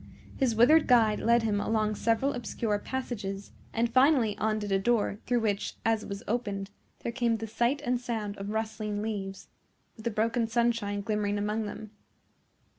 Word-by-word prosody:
His 250 -4 +1
withered 295 +8 +6
guide 225 -4 +4
led 235 +1 +3
him 205 -2 +1
along 215 0 +1
several 230 +6 +1
obscure 230 -3 -2
passages, 205 -6 -5 0.2
and 230 +1 +1
finally 255 -2 +4
undid 215 -1 -1
a 195 - +3
door, 210 -1 +1
through 245 -1 +2
which, 205 -2 -1
as 225 -1 +2
it - - -9
was 200 +2 -5
opened, 205 -4 -2 0.3
there 235 - -3
came 235 -2 +1
the 225 - -5
sight 240 +6 0
and 245 0 0
sound 220 -4 -3
of 195 +1 -5
rustling 215 -1 -2
leaves, 195 -3 -5 0.5
with 220 - -12
the - - +2
broken 230 +2 0
sunshine 230 -3 0
glimmering 205 0 -1
among 210 +1 -1
them. 210 0 -8
220 Hz, 170 wpm, -29 LUFS, 205-235 Hz, 0.5 s, withered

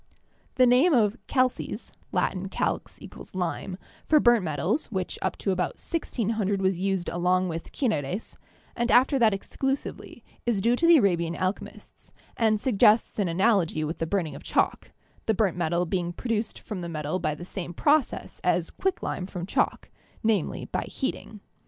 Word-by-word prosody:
The 255 - +6
name 260 +7 +5
of 215 -3 +3
"calces" 255 -2 -1 0.2
(Latin 190 0 -1
calx - - -2 0.2
= - - -12
lime) 180 +1 -3 0.3
for 310 - +6
burnt 240 -6 +5
metals, 165 - -1
which 190 -5 -4
up - - -1
to 195 - -1
about 185 -1 -1
1600 220 - -1
was 190 -2 +1
used 190 -2 -1
along 180 +1 +1
with 165 0 -6
"cineres," 190 - -2 0.4
and 240 0 0
after 265 +2 +5
that 225 -3 +5
exclusively, 270 +7 -4 0.2
is 235 -4 +1
due 235 +5 +3
to 335 +7 +2
the 335 -1 +8
Arabian 170 - +2
alchemists, 185 +2 -5 0.2
and 220 -2 +2
suggests 215 -2 +3
an 200 - +2
analogy 175 -3 +2
with 155 +2 -4
the 165 - -1
burning 170 -5 -1
of 140 - -9
chalk, - - 0 0.4
the 220 - +3
burnt 195 -4 +1
metal 175 0 0
being 175 0 -2
produced 225 +1 -2
from 210 -5 -6
the 170 - -5
metal 155 +2 -2
by 155 -3 -1
the 175 - -9
same 180 -1 -5
process 290 - +1
as - - +1
quick 385 -1 -2
lime 180 - -3
from 180 -3 -5
chalk, - - -1 0.3
namely, 215 -6 0
by - - -3
heating. - - -5
195 Hz, 165 wpm, -26 LUFS, 175-235 Hz, 0.4 s, the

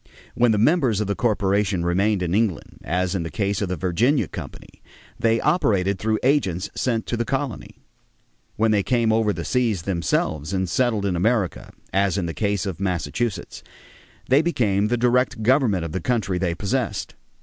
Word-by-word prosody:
When 120 -1 +3
the 105 - +2
members 125 - +3
of 105 - 0
the 100 - -1
corporation 100 -4 0
remained 95 +3 +1
in 85 -1 -2
England, 100 -6 -1
as 90 0 -1
in 95 - -1
the 80 - -4
case 100 0 -1
of 100 - -1
the 90 - -1
Virginia 95 - +1
Company, - - -10 0.4
they 115 0 +2
operated 100 - +1
through 110 +2 0
agents 115 - +1
sent 115 -3 -1
to - - -2
the 120 - -1
colony. 135 0 -4 0.8
When 110 +1 +2
they 105 -2 +3
came 115 0 +1
over 110 -1 +2
the - - -5
seas 115 -9 0
themselves 85 -3 -1
and 95 -1 0
settled 110 +1 0
in 95 -3 0
America, 100 0 0 0.2
as 100 0 +2
in 95 - -1
the 85 - -4
case 100 0 -1
of 95 -5 -4
Massachusetts, 95 +2 -3 0.7
they 135 +3 +5
became 105 - +1
the 120 +2 0
direct 125 -1 +1
government 115 - +2
of 80 - -5
the 95 - -3
country 105 -6 -1
they 85 -2 -1
possessed. 110 +3 -2
105 Hz, 180 wpm, -23 LUFS, 95-120 Hz, 0.8 s, they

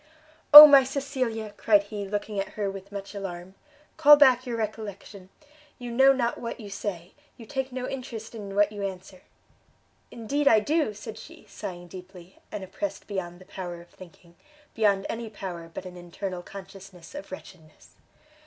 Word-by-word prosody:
"Oh 300 +1 +15
my 280 -2 +7
Cecilia!" 255 -6 -4
cried 205 -2 +3
he, 205 -1 -7
looking 205 0 -4
at 195 - -5
her 200 -2 -2
with 195 0 -11
much 200 0 -8
alarm, 190 -2 -7 0.4
"call 295 -2 +8
back 260 -3 +4
your 235 -1 -3
recollection! 205 -3 -7 0.5
you 245 -1 -8
know 265 +3 +5
not 240 -3 -1
what 230 +1 -6
you 205 -3 -10
say, 190 -3 -6 0.2
you 230 - -12
take 265 +2 -4
no 250 0 -5
interest 240 -4 -7
in 200 -3 -8
what 205 0 +3
you 205 -1 -8
answer." 190 -1 -7 0.9
"Indeed 280 +6 -2
I 220 -5 +6
do!" 290 -1 -1
said 220 +1 -9
she, - - -14
sighing 175 -1 -8
deeply, 180 0 -13
and 205 - -6
oppressed 195 +1 -6
beyond 180 -4 -5
the 185 - -16
power 175 -3 -7
of 170 - -16
thinking, 170 -1 -17 0.4
beyond 200 -3 +1
any 230 0 -5
power 180 -5 -8
but 180 - -8
an 180 -1 -10
internal 180 +1 -7
consciousness 195 -2 -13
of 290 -6 -9
wretchedness. 165 -4 -13
205 Hz, 170 wpm, -26 LUFS, 185-235 Hz, 0.9 s, Oh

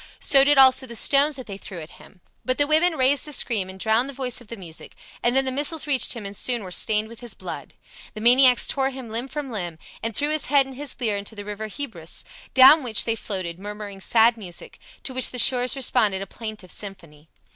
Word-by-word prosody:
So 275 -2 +4
did 290 0 +3
also 260 0 +5
the 235 - -8
stones 280 +5 +4
that 260 -1 -8
they 200 -1 -9
threw 185 -4 -9
at 155 0 -12
him. 180 - -19 0.2
But 255 0 -2
the 290 - +4
women 315 +3 +2
raised 265 +2 +2
a - - -8
scream 215 -9 -1
and 190 0 -10
drowned 225 +6 +1
the - - -7
voice 250 -2 -4
of 240 - -16
the 230 - -8
music, 170 -4 -11 0.3
and 240 +1 +1
then 270 0 +3
the 260 - 0
missiles 290 +4 0
reached 280 -4 +1
him 230 -4 -8
and 200 +1 -7
soon 240 +1 -2
were 185 - -9
stained 215 +3 0
with 230 0 -13
his 240 -2 -6
blood. - - -9 0.4
The - - -7
maniacs 250 +2 +5
tore 270 -1 -1
him 260 -3 -9
limb 230 +4 -4
from 280 -1 -6
limb, 175 -7 -5 0.2
and 225 -1 -3
threw 290 +5 0
his 310 -2 -1
head 280 0 +4
and 270 - -10
his 290 +2 -5
lyre 220 -5 -1
into 200 +2 -7
the 205 -1 -8
river 210 +1 -6
Hebrus, 210 - -6 0.3
down 270 +4 +8
which 235 -5 +2
they 225 - -1
floated, 185 -6 -5
murmuring 205 -1 -8
sad 230 +3 +3
music, 180 -5 -7 0.2
to 265 - -5
which 255 -1 +2
the 250 - -7
shores 250 +1 +5
responded 210 -7 +1
a - - -8
plaintive 215 -2 -9
symphony. 170 -7 -10
235 Hz, 235 wpm, -22 LUFS, 205-270 Hz, 0.4 s, down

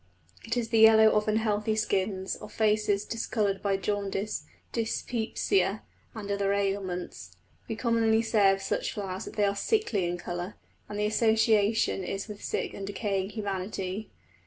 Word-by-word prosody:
It 230 +2 -2
is 230 -2 -1
the 225 -1 +3
yellow 220 0 +8
of 210 0 +1
unhealthy 215 0 +1
skins, 195 -2 -1
of - - -10
faces 210 -2 +1
discoloured 215 -3 -1
by 200 -1 +1
jaundice, 200 +1 -2 0.2
dyspepsia, 220 -4 0 0.3
and 205 -2 -5
other 200 0 +1
ailments. 195 -3 -3 0.3
We 225 - -3
commonly 225 -1 +2
say 210 -3 +4
of 195 0 -2
such - - -1
flowers 190 -2 -4
that - - -9
they 210 - +3
are 200 0 +1
"sickly" 230 - +1
in 175 +1 -2
colour, 175 +2 -5 0.3
and 205 - -5
the 210 - +1
association 220 -2 +3
is 195 +3 -4
with 210 -2 -9
sick - - -2
and 195 - -6
decaying 200 -1 -2
humanity. 195 -1 -4
205 Hz, 155 wpm, -28 LUFS, 195-220 Hz, 0.3 s, yellow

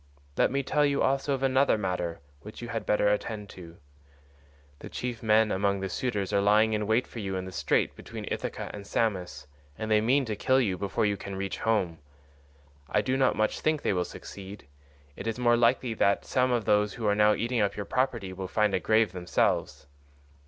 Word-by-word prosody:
Let - - +3
me 140 +1 -1
tell 150 +3 +1
you 140 -1 +2
also 135 +1 +1
of 135 - -6
another 135 -2 +3
matter 90 -5 -3 0.2
which 105 +8 -11
you 120 - -7
had 115 -2 -4
better 105 0 +3
attend 105 0 -2
to. 85 -2 -12 1.0
The - - -9
chief 120 -2 -5
men 110 -1 +3
among 100 +1 +1
the 95 0 -3
suitors 105 -4 -2
are 100 - +3
lying 105 +2 +4
in 105 -1 -1
wait 110 +3 +2
for 115 - -9
you 95 -2 -3
in 95 0 -3
the 95 - -7
Strait128 - - 0
between - - -8
Ithaca - - -4
and 100 -1 -8
Samos, 95 -8 -1 0.3
and 110 0 -4
they 105 0 +4
mean 130 +5 +2
to 110 -2 -3
kill 130 +5 +2
you 105 -8 +1
before 100 +3 -1
you 100 -1 0
can 100 0 -7
reach 95 0 -4
home. 95 -8 0 0.9
I - - +2
do 130 - 0
not 130 -1 +2
much 110 0 0
think 155 -1 0
they - - +1
will 90 -1 +1
succeed; 100 +1 -10 0.5
it - - -7
is 115 - -2
more 120 -1 +3
likely 120 0 +2
that 100 -2 +1
some 130 0 +1
of 120 -3 0
those 105 0 +2
who 115 - -5
are 105 - +3
now 105 0 +4
eating 120 0 -1
up 100 - 0
your 105 - -4
property 120 -7 -1
will 95 0 -5
find 105 +1 +1
a - - +2
grave 110 +2 +2
themselves. 90 -2 -1
105 Hz, 210 wpm, -28 LUFS, 100-120 Hz, 1.0 s, lying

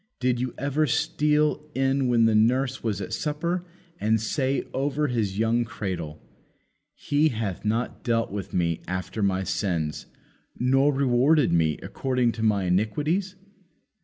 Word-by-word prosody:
Did 125 -1 +1
you 125 0 -3
ever 145 +3 0
steal 150 +3 +1
in 135 0 +1
when 120 -2 +4
his 110 -1 +3
nurse 125 +4 +2
was 105 -4 -2
at 110 +4 -5
supper 165 +7 -2 0.4
and 110 +1 +2
say 130 +4 -1
over 145 +2 0
his 105 -6 -1
young 115 +2 +2
cradle, 90 -9 -5 0.8
He 145 +2 +1
hath 110 - -4
not 115 +3 -2
dealt 115 -4 0
with 100 -1 -5
me 85 -2 0
after 95 +4 -4
my 95 -1 +1
sins, 85 -6 -2 0.5
nor 135 +3 +3
rewarded 135 - +3
me 80 -3 +2
according 125 -3 0
to 115 - -7
my 105 -3 +2
iniquities? 150 - 0
120 Hz, 140 wpm, -25 LUFS, 100-140 Hz, 0.8 s, when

